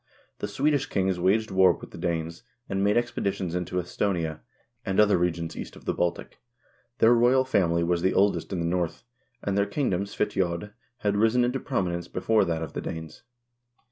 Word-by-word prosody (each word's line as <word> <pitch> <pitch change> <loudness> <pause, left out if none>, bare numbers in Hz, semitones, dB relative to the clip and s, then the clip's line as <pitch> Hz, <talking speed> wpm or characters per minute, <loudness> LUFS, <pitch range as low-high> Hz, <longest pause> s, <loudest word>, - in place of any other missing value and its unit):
The - - -2
Swed 150 +3 +1
ish 145 -1 0
kings 95 -2 0
2 - - -6
waged 105 +4 +2
war 95 -1 +5
with - - -11
the - - -10
Danes, 85 -1 -2 0.3
and 95 0 -1
made 105 +3 +3
expeditions 100 -7 -1
into 90 0 -2
Esthonia, 85 -3 -2 0.4
and 95 -3 -1
other 105 -1 +5
regions 85 -2 -1
east - - -7
of - - -15
the - - 0
Baltic. 85 -1 -2 0.6
Their 115 +2 +6
royal 125 +2 +4
family 85 -8 +2
was 85 0 +1
the 95 +1 +1
oldest 100 +1 +2
in 90 -3 -2
the - - -1
North, 85 -1 -1 0.4
and 100 - -1
their 100 0 +2
kingdom, 100 -10 0
Svitiod, 95 0 -2 0.3
had 100 -1 +1
risen 115 +3 +3
into 125 +2 -1
prominence 85 -6 -2
before 110 +5 +2
that 80 -1 -2
of 80 - -7
the - - -3
Danes. 80 -1 -7
95 Hz, 190 wpm, -26 LUFS, 85-105 Hz, 0.6 s, Their